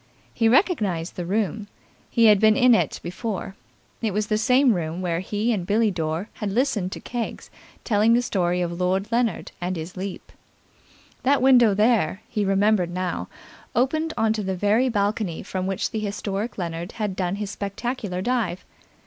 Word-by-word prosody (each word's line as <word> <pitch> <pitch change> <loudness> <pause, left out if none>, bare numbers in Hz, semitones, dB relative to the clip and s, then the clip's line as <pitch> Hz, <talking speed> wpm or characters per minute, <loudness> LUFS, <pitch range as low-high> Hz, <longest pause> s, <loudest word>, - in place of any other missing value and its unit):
He 225 -1 +2
recognized 215 - +1
the 175 -1 -4
room. 205 +1 -1 0.4
He 230 - +3
had 210 -2 +7
been 215 +2 +5
in 250 -2 +6
it - - +1
before. 190 +1 -4 0.5
It 215 -4 -1
was 210 0 +1
the 215 0 0
same 250 +2 +4
room 165 -2 -3
where 170 -2 0
he 210 +5 -1
and 195 -5 -2
Billie 215 +4 +2
Dore 165 +2 -2
had 210 - -4
listened 215 -5 0
to - - -6
Keggs 240 -2 -5 0.3
telling 220 0 +3
the 240 +1 +3
story 180 -5 0
of 170 0 -3
Lord 190 +4 0
Leonard 235 -1 0
and 180 +1 -2
his 165 +2 -6
leap. 190 0 -6 0.9
That 280 +2 +3
window 245 -5 +5
there, 210 -4 +2
he 210 -2 -1
remembered 195 -1 +2
now, 180 0 -3 0.5
opened 310 +6 +1
on 220 0 +2
to 220 - -2
the 190 -1 -2
very 210 +7 +2
balcony 205 -5 -1
from 185 0 -3
which 195 -1 -2
the 220 - -2
historic 205 +1 -3
Leonard 170 -1 -4
had 210 -4 -3
done 185 0 -1
his 205 -1 -4
spectacular 200 -2 -4
dive. 230 -7 -1
205 Hz, 175 wpm, -24 LUFS, 185-230 Hz, 0.9 s, had